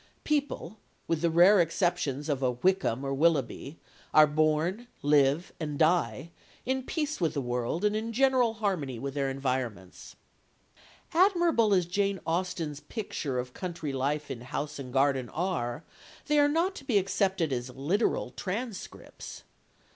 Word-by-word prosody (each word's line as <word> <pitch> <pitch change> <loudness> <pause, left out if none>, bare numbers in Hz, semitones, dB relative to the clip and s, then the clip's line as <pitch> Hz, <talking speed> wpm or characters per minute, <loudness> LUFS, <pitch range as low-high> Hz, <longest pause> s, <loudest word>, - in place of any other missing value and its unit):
People, 280 - -2 0.3
with 165 -2 0
the 170 - +2
rare 175 +4 +6
exceptions 165 -4 0
of 140 -3 -1
a 130 - +2
Wickham 140 -3 +1
or - - -2
a - - 0
Willoughby, 145 0 0 0.4
are 155 - +9
born, 155 +9 0 0.2
live, 145 +3 +3
and 150 -3 -3
die, 160 -3 +1 0.3
in 260 +1 0
peace 300 - -3
with 160 -2 +1
the - - 0
world 125 - -2
and 210 0 +2
in 225 +1 -2
general 255 -2 +3
harmony 180 - -2
with 135 +3 -5
their 140 -1 -1
environments. 125 -9 -4 1.0
Admirable 345 - +4
as 185 -3 +3
Jane 195 +2 0
Austen's 165 -3 -2
pictures 150 - -4
of 125 0 -5
country 170 -6 -5
life 145 +2 -1
in 120 -3 -6
house 145 +4 -5
and 130 -2 -7
garden 135 -1 +1
are, 160 -6 -2 0.4
they 300 -1 +3
are 290 0 +5
not 335 +6 +1
to - - -9
be 250 -6 +2
accepted 190 -5 +1
as 125 0 -3
literal 145 - 0
transcripts. 210 +2 -6
165 Hz, 150 wpm, -29 LUFS, 135-205 Hz, 1.0 s, are